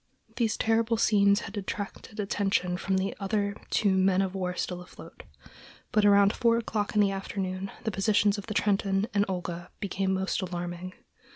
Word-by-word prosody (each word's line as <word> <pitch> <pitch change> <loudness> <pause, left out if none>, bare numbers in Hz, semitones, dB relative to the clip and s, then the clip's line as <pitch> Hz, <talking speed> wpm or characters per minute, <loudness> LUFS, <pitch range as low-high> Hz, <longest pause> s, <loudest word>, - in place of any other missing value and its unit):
These 225 -3 +1
terrible 225 +1 +2
scenes 200 -2 +4
had - - -8
detracted 205 +1 -6
attention 195 -3 0
from 190 +1 -1
the 190 +1 -1
other 200 0 -1
two 200 -3 +2
men 190 0 +3
of 190 -1 -3
war 180 -2 -2
still 180 -1 -3
afloat; 180 - -12 0.7
but 215 - +3
about 200 0 +6
four 230 -1 +3
o'clock 215 -2 -2
in 210 - +5
the 200 -1 +3
afternoon 195 -1 -4
the 220 - -1
positions 205 +1 +2
of 200 - -9
the 215 - -4
Trenton 195 -1 +1
and 200 0 +3
Olga 175 -2 -4
became 195 -2 -1
most 190 +1 -1
alarming. 175 0 -5
195 Hz, 170 wpm, -28 LUFS, 190-210 Hz, 0.7 s, about